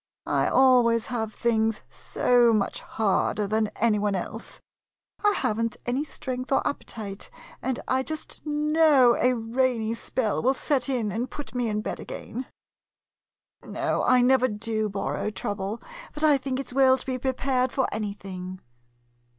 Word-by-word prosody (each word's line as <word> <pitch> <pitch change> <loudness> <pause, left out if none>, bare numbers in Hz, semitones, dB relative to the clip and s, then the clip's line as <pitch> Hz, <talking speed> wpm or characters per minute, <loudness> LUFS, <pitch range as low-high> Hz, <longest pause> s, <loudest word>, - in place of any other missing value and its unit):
I - - +1
always 245 -3 +4
have 220 -2 -2
things 225 -1 0
so 240 -2 +2
much 205 -2 0
harder 210 0 0
than 215 +2 +1
any 220 -2 +2
one 205 -1 0
else. 185 - -6 0.6
I 415 0 +4
have 220 - -1
n't 230 -1 -2
any 255 +4 0
strength 255 -3 -6
or 270 - +2
appetite, 210 -7 -6 0.3
and 260 -1 -2
I 260 0 +2
just 315 +3 -6
know 300 -4 +4
a 250 0 +3
rainy 230 -1 0
spell 230 -1 -1
will 260 +3 +2
set 275 -1 0
in 235 -6 0
and 235 +5 -2
put 280 -6 -8
me 245 -2 0
in 210 0 -1
bed - - -4
again. 265 - -7 1.2
No, - - -1
I 250 0 +4
never 255 0 +4
do 215 -1 -2
borrow 200 +1 -2
trouble, 205 +1 -4 0.4
but 300 - -4
I 300 -2 +6
think 265 0 -3
it 275 - -5
's - - -9
well 260 0 +5
to - - -10
be 255 -1 -2
prepared 260 0 0
for 265 - +1
anything. 190 -3 -5
240 Hz, 160 wpm, -26 LUFS, 215-260 Hz, 1.2 s, I